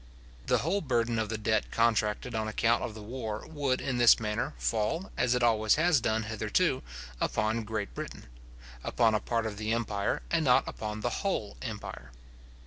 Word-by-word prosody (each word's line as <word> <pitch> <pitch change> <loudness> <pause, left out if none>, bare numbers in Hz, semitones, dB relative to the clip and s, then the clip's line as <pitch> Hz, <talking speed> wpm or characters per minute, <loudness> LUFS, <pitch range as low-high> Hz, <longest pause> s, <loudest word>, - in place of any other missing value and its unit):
The - - +4
whole 195 +5 +1
burden 120 -5 0
of 110 -2 -1
the 110 - -2
debt 110 0 0
contracted 115 0 +1
on 110 -1 -1
account 115 +2 +2
of 110 - -4
the 110 - -8
war 110 -2 -5
would 140 -4 -1
in 125 -2 -2
this 120 -1 +7
manner 105 -1 -2
fall, 105 - -1
as 125 0 +2
it 125 - +1
always 110 -2 +4
has 160 -3 +3
done 110 0 +1
hitherto, 110 -1 0 0.4
upon 110 +2 0
Great 105 -1 -3
Britain; - - -7 0.6
upon 115 -2 +2
a 105 - +2
part 115 +1 -1
of 105 -2 -4
the 110 +1 -2
empire, 110 -3 -1
and 170 -1 +2
not 125 -4 +4
upon 105 0 -5
the 120 +2 -2
whole 185 - -2
empire. 105 - -6
110 Hz, 180 wpm, -30 LUFS, 110-125 Hz, 0.6 s, this